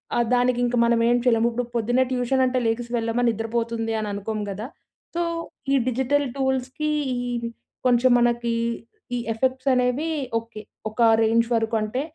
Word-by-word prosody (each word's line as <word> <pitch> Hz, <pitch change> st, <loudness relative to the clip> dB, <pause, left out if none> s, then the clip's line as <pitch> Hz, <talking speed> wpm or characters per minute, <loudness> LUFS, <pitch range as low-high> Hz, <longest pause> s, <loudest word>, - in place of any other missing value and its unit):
ఆహ్, 240 Hz, -, +2 dB
దానికి 245 Hz, 0 st, +2 dB
ఇంక 245 Hz, 0 st, 0 dB
మనం 235 Hz, 0 st, +3 dB
ఏం 240 Hz, -, +4 dB
చేయలేము 235 Hz, -2 st, +3 dB
ఇప్పుడు 245 Hz, +1 st, -2 dB
పొద్దున్నే 240 Hz, +3 st, +2 dB
ట్యూషన్ 255 Hz, +1 st, +1 dB
అంటే, 255 Hz, 0 st, 0 dB
లెగిసి 235 Hz, +1 st, -2 dB
వెళ్ళమా 230 Hz, +1 st, 0 dB
నిద్రపోతుంది 225 Hz, 0 st, -2 dB
అని 210 Hz, -, -3 dB
అనుకోము 210 Hz, +1 st, -3 dB
కదా! 210 Hz, +4 st, -5 dB, 0.5 s
సో 345 Hz, -, 0 dB, 0.5 s
ఈ -, -, +5 dB
డిజిటల్ 265 Hz, +3 st, +1 dB
టూల్స్‌కి 265 Hz, +2 st, -1 dB, 0.9 s
కొంచెం 250 Hz, 0 st, +4 dB
మనకి 235 Hz, -1 st, +1 dB, 0.6 s
ఈ -, -, 0 dB, 0.2 s
ఎఫెక్ట్స్ 260 Hz, +3 st, -1 dB
అనేవి 250 Hz, +5 st, +1 dB, 0.3 s
ఓకే. 230 Hz, -1 st, -11 dB, 0.3 s
ఒక 220 Hz, +3 st, -4 dB, 0.2 s
రేంజ్ 230 Hz, +1 st, +3 dB
వరకు 225 Hz, 0 st, 0 dB
అంటే, 215 Hz, +5 st, -2 dB
240 Hz, 150 wpm, -24 LUFS, 225-255 Hz, 0.9 s, ఈ